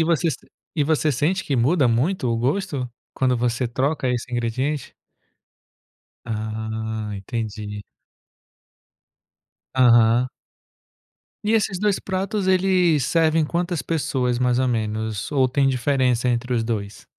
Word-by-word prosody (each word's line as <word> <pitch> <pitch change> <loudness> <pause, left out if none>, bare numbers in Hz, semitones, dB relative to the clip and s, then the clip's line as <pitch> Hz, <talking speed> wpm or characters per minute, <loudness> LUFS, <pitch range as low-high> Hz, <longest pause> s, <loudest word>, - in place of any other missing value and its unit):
e 160 - +4
você 170 0 +2 0.5
e 150 - +1
você 155 0 +1
sente 155 +9 0
que 140 - -1
muda 135 +4 +3
muito 125 +7 +1
o 115 - +1
gosto, 135 0 -1 0.2
quando 130 -1 +1
você 120 +1 0
troca 135 +3 -1
esse 125 0 -2
ingrediente? 130 +5 -2 1.3
Ah, 110 0 -4
entendi. 105 0 -5 1.9
Aham. 120 -1 +5 1.1
E 210 +2 0
esses 200 -4 +1
dois 205 -1 +1
pratos, 195 +1 -2
ele 185 -4 +3
servem 160 +3 +2
quantas 170 -1 -2
pessoas, 130 -6 -1
mais 125 -1 +2
ou 130 -1 +2
menos, 110 -1 -2
ou 130 -2 +3
tem 135 +1 +2
diferença 125 -1 +1
entre 125 +1 -1
os 115 - +1
dois? 105 -3 -4
125 Hz, 120 wpm, -22 LUFS, 115-160 Hz, 1.9 s, Aham